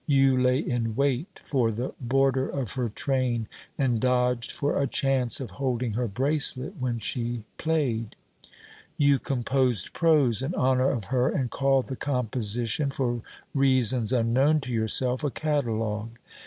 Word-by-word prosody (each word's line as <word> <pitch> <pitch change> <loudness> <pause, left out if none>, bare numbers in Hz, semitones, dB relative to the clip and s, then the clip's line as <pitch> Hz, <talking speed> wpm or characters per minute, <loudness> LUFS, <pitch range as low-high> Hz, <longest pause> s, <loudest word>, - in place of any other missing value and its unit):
You 135 -2 +4
lay 125 0 +3
in 120 -6 -2
wait 140 - -1
for 125 -5 +1
the 120 +4 -4
border 135 +1 +1
of 130 -7 -4
her 125 -3 -2
train, 125 -1 -1 0.3
and 125 -5 +1
dodged 125 -1 +1
for 145 - -1
a 140 - +1
chance 130 -2 +1
of 130 - -6
holding 125 -3 -1
her 120 +3 -1
bracelet 135 - 0
when 125 -2 -1
she 120 +1 -3 0.2
played. 135 -9 -1 0.8
You 140 -2 +4
composed 125 -5 0
prose 150 -9 +3
in 140 +7 -3
honour 130 0 +2
of 115 -6 -2
her 125 0 +2
and 125 -4 -2
called 135 -1 +2
the 130 - -5
composition 125 0 -1
(for 120 -3 -2 0.3
reasons 130 -4 +3
unknown 130 +6 +2
to 130 -2 -5
yourself) 125 +4 +2
a 145 - +1
"catalogue." 115 -7 -2
130 Hz, 145 wpm, -26 LUFS, 120-135 Hz, 0.8 s, You